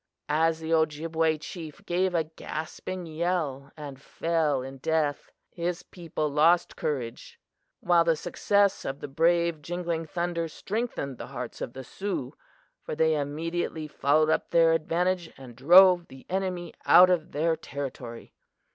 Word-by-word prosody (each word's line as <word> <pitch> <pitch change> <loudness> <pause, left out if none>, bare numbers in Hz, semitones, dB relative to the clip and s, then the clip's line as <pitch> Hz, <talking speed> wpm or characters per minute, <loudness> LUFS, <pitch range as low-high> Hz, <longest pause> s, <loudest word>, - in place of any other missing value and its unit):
As 160 +2 +2
the 160 +1 -2
Ojibway 160 0 +1
chief 155 0 -9
gave 180 +1 0
a 165 - +3
gasping 160 +3 -6
yell 155 -4 -2
and 140 -3 -8
fell 155 -4 0
in 135 0 -9
death, 155 -1 0 0.2
his 175 +1 -3
people 165 -4 -4
lost 160 +4 +3
courage; 125 -6 -4 0.4
while 175 -1 +4
the 165 -1 +3
success 200 +5 +1
of 135 +1 -4
the - - -6
brave 170 +2 +2
Jingling 170 0 -3
Thunder 170 0 -2
strengthened 195 - -4
the - - -6
hearts - - -7
of 120 - -4
the 130 - -7
Sioux, 190 -4 -4 0.5
for - - -5
they 160 0 +3
immediately 155 +2 -3
followed 150 +1 +2
up - - 0
their 165 -1 +5
advantage 170 +2 0
and 130 -3 -11
drove 175 +6 +7
the 130 0 -14
enemy 185 -3 -2
out 180 +1 +7
of 175 -1 0
their 160 +2 +1
territory. 135 -6 -7
160 Hz, 145 wpm, -27 LUFS, 150-175 Hz, 0.5 s, drove